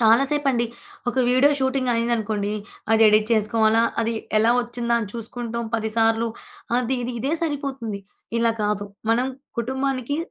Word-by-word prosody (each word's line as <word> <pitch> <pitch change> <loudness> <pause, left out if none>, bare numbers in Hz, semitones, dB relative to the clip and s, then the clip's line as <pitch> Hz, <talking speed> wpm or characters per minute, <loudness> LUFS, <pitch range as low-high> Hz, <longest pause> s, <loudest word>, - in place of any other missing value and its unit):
చాలా 230 +3 +6
సేపండి. 275 -5 +1 0.4
ఒక 245 - -2
video 255 +3 +5
shooting 265 -1 +1
అయింది 230 +1 0
అనుకోండి, 210 -2 -2 0.4
అది 225 0 +5
ఎడిట్ 215 0 +3
చేసుకోవాలా, 220 +1 +3 0.2
అది 230 0 0 0.3
ఎలా 225 +2 +4
వచ్చిందా 235 0 -2
అని 210 - -4
చూసుకుంటాం 235 0 -4
10 220 -1 -1
సార్లు 225 +1 +3 0.5
అది 250 +1 0
ఇది, 245 +1 -3
ఇదే 270 +6 -1
సరిపోతుంది. 270 -9 -3 0.4
ఇలా 230 0 +3
కాదు 205 -1 0 0.3
మనం 245 +3 +2 0.3
కుటుంబానికి 265 +2 -1
235 Hz, 145 wpm, -23 LUFS, 225-255 Hz, 0.5 s, చాలా